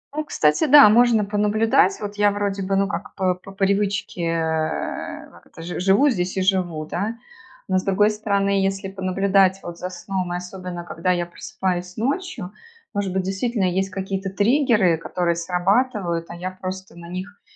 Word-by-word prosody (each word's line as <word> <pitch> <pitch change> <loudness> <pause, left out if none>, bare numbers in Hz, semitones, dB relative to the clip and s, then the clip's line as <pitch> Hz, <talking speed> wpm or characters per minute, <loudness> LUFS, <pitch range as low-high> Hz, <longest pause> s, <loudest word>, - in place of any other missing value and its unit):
Ну, 310 - -1
кстати, 150 - +2
да, 285 -2 +9
можно 230 -1 +4
понаблюдать. 210 -1 +2
Вот 205 0 -5
я, 205 0 +4
вроде 200 -1 -2
бы, 195 +1 -1
ну, 195 0 +2
как 205 - -6
по 185 -2 +1
по 180 +2 -13
привычке, 195 -2 0
э, 160 -1 -2
как - - -19
это, - - -13
жи 175 +1 -5
живу 195 +10 +4
здесь 185 -6 -2
и - - +1
живу, 180 -5 0
да. 205 +8 -3 0.5
Но, 185 - +2
с - - -6
другой 205 +2 +3
стороны, 200 -2 0
если 195 0 -2
понаблюдать 190 0 +2
вот 175 0 -7
за 180 - -4
сном, 185 -1 -4
и - - -1
особенно, 180 -1 -7
когда 175 +1 -1
я 175 -1 0
просыпаюсь 180 0 -4
ночью, 275 - -2 0.4
может 200 -2 -1
быть, 190 0 -1
действительно 195 +3 -1
есть 190 +2 0
какие-то 195 0 -4
триггеры, 210 - +3
которые 170 +1 -1
срабатывают, 180 +1 0
а 170 - -7
я 180 +2 -5
просто 185 0 -7
на 170 0 -11
них 185 +3 -7
190 Hz, 175 wpm, -22 LUFS, 180-205 Hz, 0.5 s, да